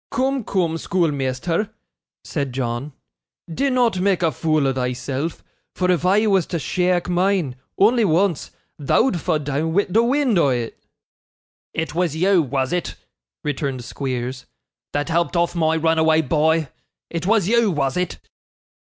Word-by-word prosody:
'Coom, 265 +1 0
coom, 170 -5 -1
schoolmeasther,' 165 +3 -1 0.5
said 140 -5 -3
John, 125 +2 -3 0.6
'dinnot 250 -4 +1
make 190 -1 +1
a 165 - +3
fool 155 +1 +1
o' 135 - +1
thyself; 130 +4 -3 0.3
for 180 0 +1
if 180 0 +1
I 205 +4 +4
was 195 -5 +2
to 170 - -2
sheake 180 +2 0
mine 180 -6 +1 0.2
only 230 +4 +4
once 175 -2 +1 0.3
thou'd 175 - +2
fa' 165 -4 +1
doon 150 +2 -2
wi' 200 +3 +3
the 225 - +4
wind 250 -4 +2
o' 145 - +4
it.' 120 -3 -3 0.9
'It 160 0 -2
was 170 -2 0
you, 185 +2 +3
was 135 -1 -1
it,' 180 - -2 0.5
returned 135 -3 -3
Squeers, 125 0 -4 0.4
'that 145 +2 -2
helped 170 +2 0
off 170 0 +1
my 160 -2 +1
runaway 160 0 +3
boy? 155 +1 +1 0.4
It 170 +1 -3
was 215 -4 +3
you, 235 0 +3
was 140 -6 0
it? 180 -1 -2
165 Hz, 145 wpm, -21 LUFS, 140-190 Hz, 0.9 s, I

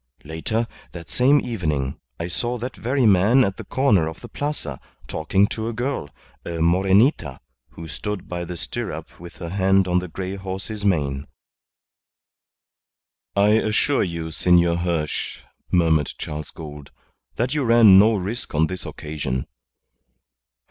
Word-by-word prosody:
Later, 80 +10 -2 0.3
that 85 -2 -9
same 140 +4 +4
evening, 75 - -2 0.2
I 85 - -2
saw 120 +8 -3
that 125 +3 -5
very 125 +6 0
man 105 +6 +5
at 95 -4 -1
the - - -6
corner 105 - +2
of 80 - -7
the - - -8
Plaza 145 - -4 0.3
talking 95 +5 +2
to 110 0 -3
a - - -4
girl, 120 - -3 0.3
a 85 - -5
Morenita, 95 - +3 0.3
who 80 0 -10
stood 105 +5 -5
by 85 0 -4
the 85 0 -6
stirrup 90 -7 -6
with 85 0 -11
her 85 - -6
hand 95 0 +3
on 90 0 +3
the 90 - -5
grey 95 +3 -5
horse's 95 +2 -5
mane." 70 -8 0 2.1
"I 100 +1 +4
assure 110 +6 +2
you, 85 -3 -3
Senor 85 0 +3
Hirsch," 85 -3 -2 0.3
murmured 80 -5 +3
Charles 75 0 -5
Gould, 75 -3 -9 0.5
"that 120 +4 0
you 150 -2 0
ran 115 -5 +7
no 110 +2 +5
risk 100 0 -4
on 80 +2 +4
this 95 +2 -6
occasion." 70 -4 -4
95 Hz, 145 wpm, -23 LUFS, 80-110 Hz, 2.1 s, ran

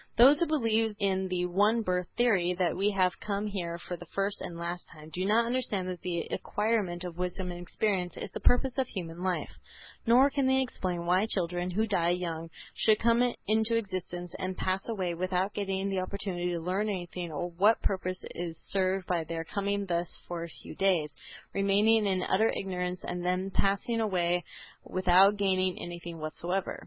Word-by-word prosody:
Those 270 +6 +8
who 340 - +4
believe 225 -7 +1
in 190 -1 +1
the 180 -1 0
one 205 +6 +3
birth 180 -2 0
theory, 195 -8 +3
that 175 -3 +2
we 200 +2 +2
have 185 -2 +1
come 205 0 -2
here 175 -4 -3
for 180 +1 -6
the 175 - -10
first 200 +3 -1
and 170 - -6
last 170 +1 -4
time, 155 -1 -12
do 185 - -1
not 225 +3 +4
understand 230 -6 -1
that 180 -2 -5
the 175 -2 -1
acquirement 205 -5 -1
of 175 -2 -6
wisdom 180 +1 -2
and 175 0 -7
experience 180 0 -1
is - - -5
the - - -5
purpose 250 +1 +3
of 260 - +1
human 175 -5 -6
life; 180 - -1 0.6
nor 255 +4 +6
can 275 -2 +1
they 265 0 +4
explain 180 -9 -2
why 185 +5 +3
children 180 -3 -1
who 215 +5 +1
die 175 -5 +2
young 165 -2 -2 0.2
should 215 -1 +4
come 235 +1 +4 0.3
into 220 +2 +2
existence 180 -4 -4
and 185 -1 -3
pass 190 +1 0
away 185 -6 -1
without 185 +3 -1
getting 195 -1 -1
the 190 - 0
opportunity 185 -2 -3
to 170 - -2
learn 190 +5 -1
anything 175 -3 -4
or 175 +4 -3
what 200 +6 +4
purpose 185 -1 -1
is 170 -2 -5
served 190 -1 +1
by 175 -2 +1
their 165 +1 -4
coming 200 +3 -1
thus 175 -1 -1 0.2
for 170 -1 -4
a 170 - -6
few - - -8
days, 175 -7 +2 0.4
remaining 205 +3 +4
in 185 -2 +1
utter 220 +4 +3
ignorance 180 -1 -3
and 175 0 -3
then 185 +2 0
passing 200 +5 +1
away 180 -4 +1 0.4
without 185 +2 +4
gaining 185 -2 +1
anything 170 -1 -7
whatever. 175 +5 -3
185 Hz, 185 wpm, -30 LUFS, 175-205 Hz, 0.6 s, Those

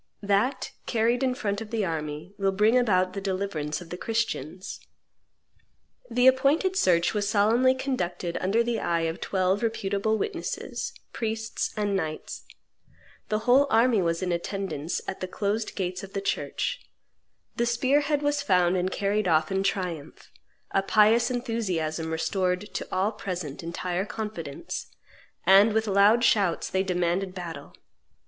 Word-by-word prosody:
That, 205 +7 +1 0.2
carried 235 +2 +1
in 255 -1 +1
front 205 -5 -2
of 220 - -7
the 220 -3 -1
army, 155 +1 -4
will 195 -1 +2
bring 210 +5 +3
about 185 -7 +3
the 195 - -4
deliverance 185 -6 -2
of 165 - -12
the 180 - -4
Christians." 195 -7 -3 1.3
The 250 0 +2
appointed 275 +8 +4
search 175 - +3
was 205 -1 0
solemnly 230 +5 +4
conducted 180 -10 -3
under 210 +5 +2
the 235 -1 -1
eye 170 -3 0
of 165 +1 -2
twelve 190 +1 +1
reputable 220 -1 0
witnesses, 420 - -4 0.2
priests 220 -1 -2
and 205 -1 0
knights; 155 -4 -4 0.8
the 215 +1 -1
whole 265 +3 +5
army 230 -2 +4
was 170 +1 0
in 180 - -1
attendance 170 -3 -3
at - - -4
the 185 - -3
closed 210 +4 -2
gates 185 -1 -3
of 195 0 -10
the 200 - -1
church; 200 - -2 0.8
the 235 - +1
spear 260 +5 +2
head 290 0 0
was 290 0 +1
found 180 -7 +3
and 185 +1 0
carried 205 +1 0
off 155 -1 +2
in 190 0 +1
triumph; 180 -6 -3 0.4
a 195 - +2
pious 220 +4 +4
enthusiasm 190 -11 -2
restored 180 +4 -1
to - - -4
all 190 +3 +1
present 180 -9 -5
entire 175 +2 -3
confidence; 175 -10 -5 0.6
and 195 +4 +7
with 220 0 +1
loud 205 +3 +4
shouts 195 -8 +2
they 190 - +2
demanded 180 0 -1
battle. 165 -6 -7
195 Hz, 150 wpm, -27 LUFS, 180-225 Hz, 1.3 s, and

